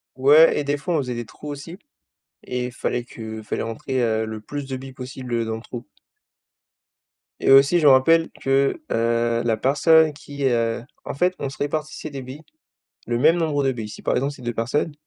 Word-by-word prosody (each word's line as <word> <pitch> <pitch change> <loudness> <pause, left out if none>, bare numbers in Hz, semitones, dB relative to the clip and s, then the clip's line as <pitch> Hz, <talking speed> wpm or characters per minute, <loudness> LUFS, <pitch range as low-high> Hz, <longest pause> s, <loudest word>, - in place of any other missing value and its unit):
Ouais 150 +5 +6
et - - -1
des 145 +1 -1
fois, 175 +4 -3
on - - +3
faisait 125 -3 -3
des 120 0 -5
trous 150 - -12
aussi 145 +5 -7 0.7
et 125 0 -3
il 125 - -7
fallait 120 -1 -2
que 110 -2 -8
fallait - - -3
rentrer, 125 +3 -3
heu, 110 -1 0
le 110 0 -6
plus 145 +4 -6
de 130 - -3
billes 130 0 -9
possibles, 130 -1 -8
heu, 115 -1 +1
dans 110 0 -3
le 115 - -9
trou. 120 -1 -8 1.5
Et - - +2
aussi 140 +6 +6
je 155 - 0
me - - +9
rappelle 165 +5 +4
que, 135 - +2
heu, 115 0 +1
la 115 -2 +1
personne 155 +5 +4
qui, 145 -1 -6
heu 115 -2 0 0.2
en - - -4
fait, 180 +6 +1
on 140 - -3
se - - -11
répartissait 155 +1 -3
des 140 -2 -7
billes, 130 +5 -10 0.6
le 120 0 -1
même 160 +6 +5
nombre 150 -4 0
de 135 - +2
billes. 110 -3 -6
Si, 105 - -10
par - - 0
exemple, 140 +3 0
c'est 135 - -13
2 120 - -2
personnes, 135 +7 -1
135 Hz, 215 wpm, -22 LUFS, 120-145 Hz, 1.5 s, me